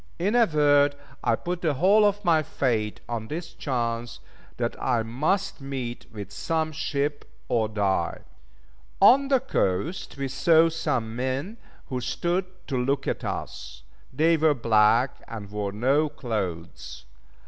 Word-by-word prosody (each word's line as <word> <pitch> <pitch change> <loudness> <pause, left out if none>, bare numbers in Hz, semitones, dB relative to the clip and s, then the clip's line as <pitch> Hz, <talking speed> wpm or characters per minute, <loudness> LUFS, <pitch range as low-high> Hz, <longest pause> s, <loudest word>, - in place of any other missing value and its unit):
In 200 +5 0
a 240 -2 +5
word, 145 -2 +4 0.3
I 115 - +3
put 175 +7 -4
the 155 -4 +1
whole 200 +8 +5
of 205 0 0
my 160 -2 +4
fate 115 -8 -1
on 115 -2 -4
this 165 +4 -6
chance, 115 -3 -3 0.4
that - - -1
I 120 -3 +1
must 150 - -1
meet 130 -3 -5
with 100 -3 -8
some 160 +7 -1
ship, 145 -1 -2 0.2
or 110 -3 +1
die. 100 -3 -1 0.8
On 275 +3 +6
the 270 -2 +4
coast 150 - -2
we 135 0 -2
saw 160 +5 +4
some 130 -9 -2
men 130 - -3 0.3
who 125 -1 -2
stood 175 +9 -1 0.2
to 135 - -2
look 135 +1 -1
at - - -2
us. - - -6 0.3
They 165 +2 +3
were 155 -1 +3
black, 115 +1 +3
and 105 -3 -8
wore 105 -1 -3
no 135 +9 +2
clothes. 90 - -5
135 Hz, 145 wpm, -26 LUFS, 115-160 Hz, 0.8 s, On